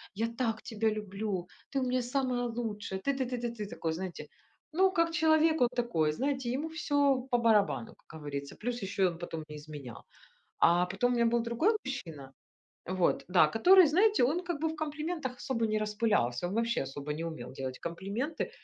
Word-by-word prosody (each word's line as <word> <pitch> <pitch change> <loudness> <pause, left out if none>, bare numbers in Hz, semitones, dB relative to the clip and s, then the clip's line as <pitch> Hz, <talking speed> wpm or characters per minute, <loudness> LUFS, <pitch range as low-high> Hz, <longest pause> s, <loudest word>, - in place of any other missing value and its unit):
"Я 225 +3 0
так 230 -1 -2
тебя 220 0 0
люблю, 205 -3 -3 0.3
ты - - +3
у 260 - 0
меня 255 0 +1
самая 250 -1 0
лучшая, 215 -5 -4
ты 275 +5 0
ты 260 - 0
ты 250 0 -3
ты 235 -1 -3
ты". 210 - -4
Такой, 165 - -3
знаете, 185 +1 -6 0.4
ну, 375 +4 +4
как 335 -2 +2
человек 320 -1 +4
вот 245 0 +4
такой, 170 -11 +1
знаете, 265 - -1
ему 300 +5 -2
всё 285 -4 +1
по 245 - +4
барабану, 225 0 +2
как 160 - -10
говорится. 140 -1 -5
Плюс 240 -1 -4
ещё 195 -1 +1
он 170 -1 -4
потом 165 -2 -5
мне 150 0 -8
изменял. 145 -5 -9 0.5
А 175 +1 +4
потом 225 +7 0
у - - +1
меня 235 - +3
был - - +1
другой 235 - +2
мужчина, 160 - -6 0.6
вот. 185 -1 +1
Да, 180 -4 +5
который, 365 +9 +7
знаете, 395 - +4
он 320 +8 +1
как 345 -4 -3
бы 320 - +2
в 320 - -5
комплиментах 305 -3 -3
особо 230 -4 -1
не 215 0 0
распылялся, 210 - 0
он 190 - -4
вообще 230 -3 +1
особо 140 +2 -5
не 160 +2 -4
умел 130 -7 -7
делать 130 -1 -5
комплименты, 200 - -3
230 Hz, 195 wpm, -31 LUFS, 180-270 Hz, 0.6 s, который